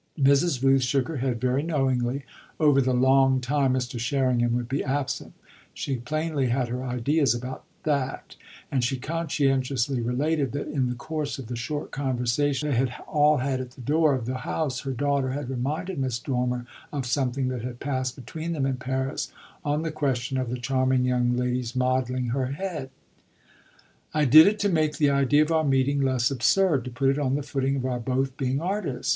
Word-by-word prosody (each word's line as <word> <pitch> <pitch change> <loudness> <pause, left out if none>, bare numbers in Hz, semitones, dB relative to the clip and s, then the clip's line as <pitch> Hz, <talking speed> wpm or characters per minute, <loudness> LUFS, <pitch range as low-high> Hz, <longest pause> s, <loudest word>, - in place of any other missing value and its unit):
Mrs. 140 0 +3
Rooth 135 0 +5
shook 130 +1 +1
her 160 - -3
head 125 -2 -1
very 130 +3 +1
knowingly 135 -4 0 0.3
over 145 -3 +5
the 130 0 +1
"long 130 +1 +4
time" 135 0 +1
Mr. 125 -1 -3
Sherringham 120 -1 +1
would 120 -1 -2
be 135 +3 -1
absent 135 -1 -2 0.4
she 135 -2 -2
plainly 150 +2 -1
had 125 0 0
her 125 +2 -3
ideas 130 +2 +1
about 125 +2 -6 0.2
that; 140 -3 -2 0.4
and 130 -3 +1
she 130 +2 0
conscientiously 135 -4 0
related 135 +3 0
that 145 - -3
in 135 -4 0
the 125 - -3
course 150 +1 -4
of 135 - -7
the 120 +2 -5
short 145 +6 -4
conversation 135 +2 0
they - - +1
had 130 0 +1 0.2
all 150 0 +4
had 130 0 -1
at 125 -1 -8
the 130 - -12
door 150 +2 +3
of 125 -3 -4
the 130 +2 -2
house 135 -4 -2
her 135 - -4
daughter 140 0 0
had 140 -2 -4
reminded 155 +7 -3
Miss 130 -3 -1
Dormer 125 -1 -2 0.3
of 140 -3 -3
something 130 0 0
that 125 -2 -3
had 120 0 -6
passed 130 -3 -2
between 160 +6 -5
them 140 -4 -1
in 135 -1 -1
Paris 130 +2 -3 0.3
on 150 +1 0
the 165 - -2
question 135 -4 -1
of 130 -2 -2
the 125 - -2
charming 130 +1 +1
young 125 -1 +1
lady's 125 0 -1
modelling 130 -1 0
her 130 +1 0
head. 150 -1 -4 1.3
"I 150 -1 +3
did 155 +6 +9
it 210 +1 +2
to 205 - +3
make 155 -4 +1
the 145 -2 +3
idea 140 +2 +4
of 155 - -3
our 160 -1 +3
meeting 140 0 +2
less 130 -2 +2
absurd 135 - +2
to - - -4
put 135 +2 +1
it 140 - -1
on 135 -2 +1
the 145 - -2
footing 135 -1 -1
of 130 -2 -2
our 125 -1 -1
both 130 +2 -1
being 135 0 -1
artists. 180 -6 -2
135 Hz, 195 wpm, -26 LUFS, 125-145 Hz, 1.3 s, did